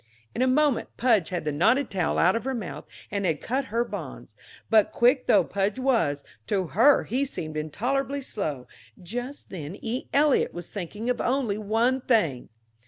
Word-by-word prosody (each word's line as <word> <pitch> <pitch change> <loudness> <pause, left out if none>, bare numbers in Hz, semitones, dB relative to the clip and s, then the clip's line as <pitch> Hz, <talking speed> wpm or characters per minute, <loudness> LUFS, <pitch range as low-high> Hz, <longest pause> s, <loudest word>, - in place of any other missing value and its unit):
In - - -2
a 260 - +4
moment 285 0 +2
Pudge 225 -9 +3
had 175 -4 -3
the 150 - 0
knotted 225 - +2
towel 180 -4 0
out 185 +3 +4
of 230 - -2
her 265 0 -2
mouth, 210 -7 -6 0.3
and 200 0 -1
had 165 -5 0
cut 265 +3 -2
her 230 +2 -1
bonds. - - -8 0.3
But 220 -2 +4
quick 250 +2 +3
though 200 -3 +5
Pudge 195 +5 -1
was, 230 - +1 0.2
to 195 -3 0
her 260 - +5
he 260 +4 -1
seemed 160 - -5
intolerably 265 - -2
slow; 150 - -4 0.3
just 245 +10 -6
then 170 0 -6
E. 240 +3 -4
Eliot 290 0 +3
was 175 -1 -7
thinking 205 +4 -5
of 250 - -2
only 245 -5 0
one 230 +5 +1
thing. 170 - +1
225 Hz, 175 wpm, -26 LUFS, 180-255 Hz, 0.3 s, though